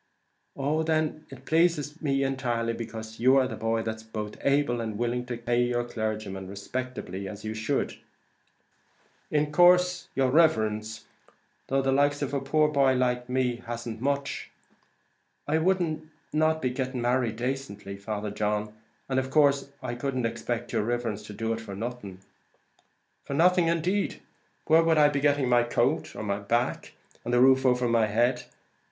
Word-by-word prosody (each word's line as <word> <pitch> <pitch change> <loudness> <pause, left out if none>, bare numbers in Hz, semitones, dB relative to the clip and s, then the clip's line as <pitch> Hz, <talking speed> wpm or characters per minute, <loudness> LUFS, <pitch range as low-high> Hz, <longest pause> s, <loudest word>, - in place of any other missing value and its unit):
"Oh 145 +3 0
then 155 -1 -1
it 135 -1 -12
pleases 160 -2 +1
me 135 -3 +1
entirely, 120 -4 -1
because 110 -1 -7
you 130 +3 +5
are 130 -1 +3
the - - -6
boy 115 0 -1
that's 110 0 -4
both 110 -1 -6
able 140 -4 +1
and 110 -2 -4
willing 120 +1 -1
to 120 -2 -4
pay 120 +1 0
your 120 0 +1
clergyman 110 -5 -4
respectably 100 -1 -5
as 100 +1 -8
you 110 - -3
should 110 0 -2 0.6
" - - -42 0.5
"In 150 0 +1
course, 180 +2 +4
your 130 -1 +2
riverence, 110 -8 +2 0.6
though 135 0 +1
the 135 - +2
likes 145 +1 +2
of 140 0 -3
a 140 - 0
poor 155 +3 +2
boy 140 -3 +3
like 125 -1 0
me 125 -1 0
hasn't 120 -1 -6
much, 140 +1 -2 1.0
I 155 +2 +2
wouldn't 165 -3 0 0.2
not 155 0 +2
be 125 -1 0 0.2
married 120 -1 0
dacently, 120 -6 -4
Father 105 +1 -4
John; 105 0 -1 0.3
and 130 -1 +1
in 130 0 -3
course 140 -1 +3
I 125 -2 -3
couldn't 130 0 -2
expect 120 +1 -3
yer 110 - +2
riverence 115 -1 -2
to 105 - -8
be - - -12
doing 115 0 -1
it - - -9
for 100 -3 -8
nothing." 105 -4 -6 1.0
"For 140 - -4
nothing 180 +2 +4
indeed! 175 +5 0 0.5
Where 160 +1 +5
would 165 -1 +3
I 150 -1 +6
be 145 -1 -1
getting 145 -2 +2
the 120 -1 +4
coat 120 - 0
on 110 - -5
my 100 0 -1
back, 120 +5 -1 0.3
and 120 - -3
the 120 - +4
roof 130 +1 +5
over 125 -1 +2
my 115 -2 +3
head? 120 +4 +1
125 Hz, 170 wpm, -27 LUFS, 115-145 Hz, 1.0 s, I